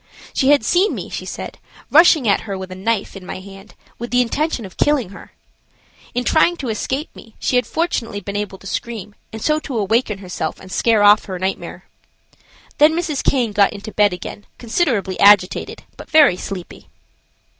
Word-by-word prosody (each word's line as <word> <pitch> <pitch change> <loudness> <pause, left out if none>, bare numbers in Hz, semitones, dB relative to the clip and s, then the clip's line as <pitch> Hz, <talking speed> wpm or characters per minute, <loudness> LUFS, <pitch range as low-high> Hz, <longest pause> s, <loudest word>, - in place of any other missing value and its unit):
She 265 - +2
had 285 -6 +4
seen 370 - +2
me, - - -6
she - - -6
said, - - -7 0.3
rushing 315 -5 +6
at 200 - +3
her 200 -3 -5
with 190 -1 -8
a - - -6
knife 205 +2 -2
in 195 - -9
my 180 - -7
hand, 195 +1 -13 0.2
with 240 +1 -5
the 250 0 +3
intention 270 -1 -2
of 190 - -12
killing 290 -9 +1
her. 200 - -13 0.8
In 245 - 0
trying 325 +6 +3
to 265 -6 -4
escape 265 +7 -3
me 225 - -15
she - - -1
had 250 - +2
fortunately 250 -11 -2
been 200 0 -7
able 205 -2 -3
to 195 - -18
scream, 210 -1 -5 0.2
and 220 -1 -7
so 305 0 +2
to 275 -5 -5
awaken 215 +1 0
herself 180 -5 -5
and 185 - -13
scare 225 -1 +2
off 205 +1 +6
her 185 -3 -5
nightmare. 190 +1 -4 0.9
Then 300 +2 +6
Mrs. 320 -5 -2
Caine 245 -5 +1
got 205 -1 +3
into 205 +1 -8
bed 205 -1 +3
again, 180 +3 -8
considerably 230 - -1
agitated, 200 -2 +4
but - - -11
very 300 - +6
sleepy. 185 -1 -8
220 Hz, 190 wpm, -19 LUFS, 195-270 Hz, 0.9 s, rushing